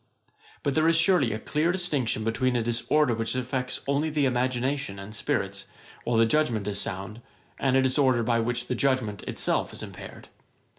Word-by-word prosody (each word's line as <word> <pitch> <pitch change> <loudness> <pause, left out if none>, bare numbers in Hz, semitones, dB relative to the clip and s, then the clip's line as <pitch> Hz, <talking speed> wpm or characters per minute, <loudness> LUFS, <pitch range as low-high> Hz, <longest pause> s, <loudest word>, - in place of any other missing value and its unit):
But 140 - 0
there 155 +3 +3
is 165 - +4
surely 165 - +3
a 110 - -2
clear 150 +9 0
distinction 150 -12 0
between 120 +3 0
a 120 - +1
disorder 120 +4 +1
which 115 +2 -2
affects 125 0 -3
only 140 +3 0
the 150 -2 +1
imagination 130 -2 -1
and 100 +2 -9
spirits, 105 - -2 0.4
while 120 -1 +1
the 115 - +5
judgement 115 -5 +1
is 100 -1 0
sound, 100 +2 -5 0.4
and 135 -1 +2
a 135 - +3
disorder 130 -2 +2
by 115 0 +1
which 120 +1 -1
the 125 - -2
judgement 125 -5 0
itself - - 0
is - - -3
impaired. - - -10
125 Hz, 180 wpm, -26 LUFS, 115-140 Hz, 0.4 s, the